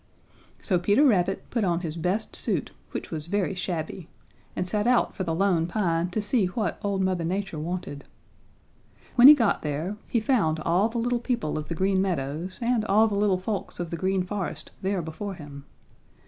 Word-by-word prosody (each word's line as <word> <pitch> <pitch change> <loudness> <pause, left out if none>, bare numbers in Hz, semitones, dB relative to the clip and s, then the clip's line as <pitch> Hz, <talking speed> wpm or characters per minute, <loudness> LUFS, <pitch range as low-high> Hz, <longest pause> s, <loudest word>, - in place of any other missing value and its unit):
"So 185 -4 +1
Peter 205 +10 +3
Rabbit 195 -6 +2
put 230 -3 0
on 175 -2 +1
his 165 -3 -4
best 180 +6 -1
suit, - - +1 0.2
which - - -6
was 155 -1 -5
very 195 +1 0
shabby, 175 -2 -4 0.5
and 180 - -2
set 210 +3 0
out 250 -1 +3
for 190 - -3
the 165 -3 -1
Lone 175 -3 +2
Pine 175 -3 0
to 210 +3 -2
see 205 -2 +2
what 210 +4 -2
old 200 -2 0
Mother 185 -2 0
Nature 190 -1 -2
wanted. 160 -3 -5 1.1
When 250 +1 +8
he 300 - +11
got 230 -7 +1
there, 155 +7 -3
he 235 - +1
found 210 - +1
all 180 +7 +2
the 235 - -5
little 240 +1 0
people 235 - -2
of 155 0 -4
the 165 - -2
Green 190 +2 +2
Meadows 170 0 -2
and 235 -2 +2
all 215 +2 +4
the 210 - -3
little 200 -2 +2
folks 195 0 -4
of 175 -2 -4
the - - -2
Green 185 +2 0
Forest 180 -5 -5
there 190 -2 -1
before 190 +5 -5
him. 145 -4 -10
185 Hz, 190 wpm, -26 LUFS, 170-210 Hz, 1.1 s, he